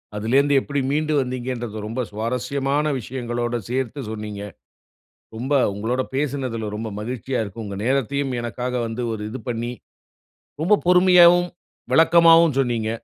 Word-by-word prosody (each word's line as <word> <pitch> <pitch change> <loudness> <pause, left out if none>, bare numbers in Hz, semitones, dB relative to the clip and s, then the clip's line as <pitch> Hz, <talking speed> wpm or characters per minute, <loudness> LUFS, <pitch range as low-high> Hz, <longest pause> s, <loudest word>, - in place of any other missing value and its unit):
அதுலேந்து 135 +7 +2
எப்டி 140 -1 -2
மீண்டு 155 +2 0
வந்தீங்கன்றத 125 -3 -4
ரொம்ப 115 +4 -5
சுவாரஸ்யமான 130 +6 -1
விஷயங்களோட 120 0 -3
சேர்த்து 130 +2 -2
சொன்னீங்க. 105 -2 -6 0.9
ரொம்ப 130 +5 -3 0.2
உங்களோட 115 +5 -1
பேசுனதுல 135 -5 -2
ரொம்ப 110 +1 -4
மகிழ்ச்சியா 125 +3 -3
இருக்கும். 110 +2 -7
உங்க 100 -1 -6
நேரத்தையும் 135 +1 0
எனக்காக 125 +2 -4
வந்து 115 +2 -5
ஒரு 105 - -5
இது 130 +4 -6
பண்ணி. 120 +1 -3 0.9
ரொம்ப 205 +5 +4
பொறுமையாகவும் 180 -1 +6 0.4
விளக்கமாவும் 165 -2 +6
சொன்னீங்க. 120 -4 0
125 Hz, 120 wpm, -22 LUFS, 115-140 Hz, 0.9 s, பொறுமையாகவும்